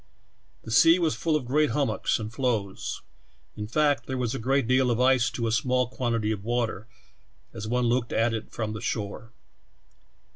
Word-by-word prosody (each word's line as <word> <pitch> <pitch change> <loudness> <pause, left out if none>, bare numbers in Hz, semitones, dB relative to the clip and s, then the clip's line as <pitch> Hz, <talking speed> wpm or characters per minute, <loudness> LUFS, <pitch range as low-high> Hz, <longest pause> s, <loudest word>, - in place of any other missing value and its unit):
The 110 - -8
sea 165 +8 +6
was 165 -4 +1
full 160 -2 0
of 145 -5 -1
great 150 +4 +2
hummocks 140 +3 0
and 110 0 -6
floes 115 -7 -2 0.3
— 65 - -38
in 105 0 -5
fact, 145 +5 +1
there 130 - -3
was 120 -2 -1
a - - -3
gi'eat 135 +3 +1
deal 130 +1 +3
of 120 -1 0
ice 130 -1 +4
to 115 0 -3
a 115 - 0
small 125 +2 +1
quantit^^ 115 -4 -1
of 100 -2 -7
water, 115 -2 -2 0.7
as 110 - -6
one 125 +2 +1
looked 120 0 0
at 115 +1 +1
it 110 -1 -5
from 110 -2 -4
the 105 - -6
shore. 110 0 -4
120 Hz, 190 wpm, -26 LUFS, 110-130 Hz, 0.7 s, sea